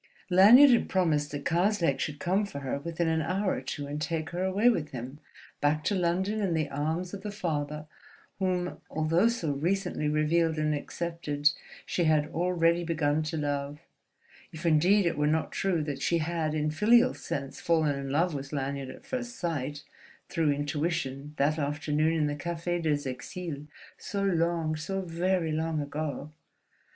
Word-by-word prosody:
Lanyard 230 +10 +9
had 240 - +3
promised 155 -6 +1
that 145 -1 -6
Karslake 175 -4 +2
should 150 -1 -3
come 190 +6 +1
for 140 -9 -6
her 135 +1 -2
within 170 +2 -2
an 160 0 +1
hour 190 +4 0
or - - -3
two 145 - -5
and 145 +1 -5
take 160 -1 -2
her 175 +2 -2
away 195 +5 +2
with 165 -11 +2
him, 130 +3 -7 0.4
back 150 +1 +1
to 205 - 0
London 190 +4 0
and 180 -5 +1
the 155 - -1
arms 160 +6 -2
of 200 - -6
the 210 - -5
father 150 -6 -3 0.5
whom, 180 -2 -1
although 165 +6 +2
so 230 -10 -1
recently 160 +1 -1
revealed 155 +2 +2
and 155 0 +1
accepted, 150 -1 -1 0.3
she 175 - 0
had 155 -1 +3
already 170 0 +1
begun 155 -2 +1
to 155 +1 -3
love; 145 0 -2 0.7
if 160 +2 -8
indeed 175 +5 +4
it 165 -3 0
were 150 - +2
not 160 +1 0
true 180 -5 0
that 145 -2 -4
she 170 - +2
had 160 -1 -1
in 155 0 0
filial 235 +9 +4
sense 140 -1 -5
fallen 160 -3 +2
in 140 0 -5
love 165 +5 +1
with 140 -1 -5
Lanyard 140 -2 -3
at - - -11
first 245 -2 -4
sight, 145 -4 -3 0.5
through 160 -2 +1
intuition, 145 -1 -2
that 150 +3 +2
afternoon 150 +2 0
in 160 -2 +1
the 145 0 -1
Café 170 +3 -3
des 145 -3 0
Exiles 150 +3 -6 0.3
so 200 -1 -3
long, 170 -4 +1
so 190 +5 -3
very 175 -1 0
long 160 0 -1
ago! 145 0 -4
160 Hz, 170 wpm, -29 LUFS, 150-175 Hz, 0.7 s, Lanyard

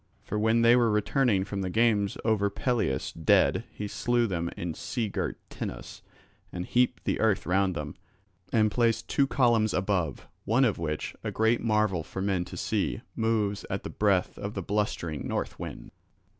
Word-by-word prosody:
For 105 - -3
when 110 +2 +3
they 115 +1 +7
were 120 -2 +4
returning 105 -1 +2
from 100 -1 -4
the 95 - -2
games 105 -1 +2
over 105 -3 +2
Pelias 110 - -1
dead 80 -2 +3
he 105 - -5
slew 120 +3 +1
them 85 -5 -2
in 85 -1 -3
sea 115 +5 -3
girt - - -3
Tenos - - -6 0.5
and 90 0 -4
heaped 125 +4 +1
the - - -1
earth 110 -3 +2
round 95 0 +1
them, 75 -2 -5 0.6
and 110 -2 +3
placed 115 -1 +1
two 140 - +2
columns 120 -6 +2
above, 90 -6 -1 0.2
one 120 +6 +3
of 110 - 0
which, 75 -2 -3
a - - -2
great 110 +2 +2
marvel 105 -5 +1
for 90 - -7
men 95 -2 0
to - - -9
see, - - -1
moves 110 -3 0
at - - -3
the - - -6
breath 100 -4 +1
of 100 0 -5
the 95 - -3
blustering 85 -7 -2
north - - -3
wind. - - -7
105 Hz, 175 wpm, -28 LUFS, 95-115 Hz, 0.6 s, they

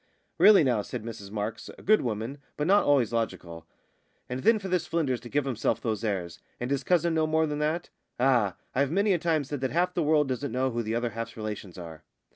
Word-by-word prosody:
"Really 205 -5 +8
now," 120 -6 +2
said 115 +2 -6
Mrs 110 -3 -8
Marks, 105 +2 -4
a - - -14
good 215 +2 +4
woman, 115 +4 -3 0.2
but 150 - -1
not 200 +4 +4
always 135 -5 +3
logical; 85 -8 -3 0.6
"and 125 +1 -4
then 225 - +5
for 200 -2 -6
this 180 -2 0
Flynders 140 -7 0
to 120 - -11
give 145 +1 0
himself 115 -3 0
those 110 -2 -2
airs 95 -6 -3 0.2
and 125 +2 -3
his 140 -1 0
cousin 170 -2 +2
no 160 -1 +2
more 160 0 +2
than 150 -1 -3
that! 155 +3 -1 0.3
Ah! 120 -7 +3 0.2
I've 140 +1 +1
many 200 +5 +2
a 175 - +1
time 160 -2 +1
said 140 0 -5
that 130 - 0
half 180 +4 +1
the 175 - 0
world 150 -2 +3
doesn't 130 0 -3
know 130 +2 0
who 120 0 -1
the 110 0 -2
other 120 0 -1
half's 115 +1 -6
relations 105 -4 -6
are!" 80 -3 -9
130 Hz, 230 wpm, -28 LUFS, 115-155 Hz, 0.6 s, Really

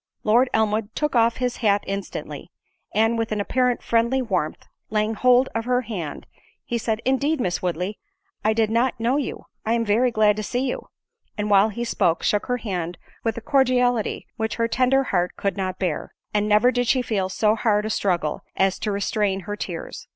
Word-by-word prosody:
Lord 240 +4 +4
Elmwood 220 0 0
took 300 -3 -1
off 230 0 +3
his 250 -1 -1
hat 205 -3 +2
instantly—and, 220 +3 -3
with 225 -1 -2
an 210 - -1
apparent 250 +4 +1
friendly 235 +3 +2
warmth, 185 -11 -2 0.3
laying 215 +1 0
hold 250 +3 +4
of 225 0 -2
her 250 0 +2
hand, 190 - -6 0.4
he 235 - -2
said, 220 0 -2
"Indeed, 280 +4 +1
Miss 180 -7 -1
Woodley, 180 +3 -2 0.4
I 215 - +3
did 220 -1 +1
not 240 +2 +1
know 240 +4 +1
you—I 230 -5 -4
am 230 -1 +1
very 225 +4 +3
glad 215 -2 +3
to - - -1
see 250 +5 -1
you:" 250 - -4 0.5
and 210 0 -1
while 200 +2 +6
he 235 +3 -4
spoke, 175 -8 +1
shook 210 - +1
her 250 - 0
hand 180 -7 -4 0.3
with 225 -1 -1
a - - -4
cordiality 250 -3 +2
which 220 -1 -2
her 230 0 +1
tender 255 +3 +3
heart 180 -7 0
could 200 -2 -1
not 185 -1 -3
bear—and 205 +4 -3
never 215 +4 +5
did 245 -1 0
she 255 +1 +3
feel 195 -5 -1
so 210 +3 +2
hard 210 -2 +1
a 215 - -2
struggle 175 -7 0
as 190 0 +1
to 210 - -2
restrain 200 -1 0
her 205 +2 -5
tears. 175 -5 -6
220 Hz, 190 wpm, -23 LUFS, 200-245 Hz, 0.5 s, while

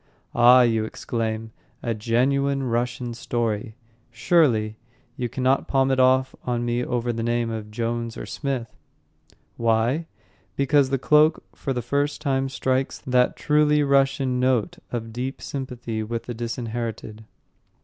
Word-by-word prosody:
"Ah," 125 +2 +7
you 115 -2 +2
exclaim, 110 0 -3 0.3
"a 115 - 0
genuine 135 +5 +1
Russian 120 0 -2
story, 115 -2 -2 0.3
Surely. 115 -4 +2 0.4
You 125 -3 -3
cannot 130 +2 +1
palm 135 -1 +2
it 130 - +1
off 130 0 +4
on 120 -1 -1
me 120 +1 0
over 120 -1 -1
the 115 - -3
name 120 0 0
of 110 -1 -5
Jones 115 +1 -3
or - - -6
Smith." 130 -6 -4 0.8
Why? 115 +7 +1 0.5
Because 140 0 +3
The 135 - +1
Cloak 150 +4 +4
for 135 - -4
the 125 -2 -2
first 140 +4 -1
time 135 -3 0
strikes 130 0 -1
that 125 -1 +2
truly 150 0 +3
Russian 135 -2 +2
note 125 -4 +1
of 115 -2 -4
deep 130 +3 -4
sympathy 125 -5 -5
with 115 +1 -4
the 120 - -6
disinherited. 115 -2 -5
125 Hz, 140 wpm, -24 LUFS, 115-135 Hz, 0.8 s, Ah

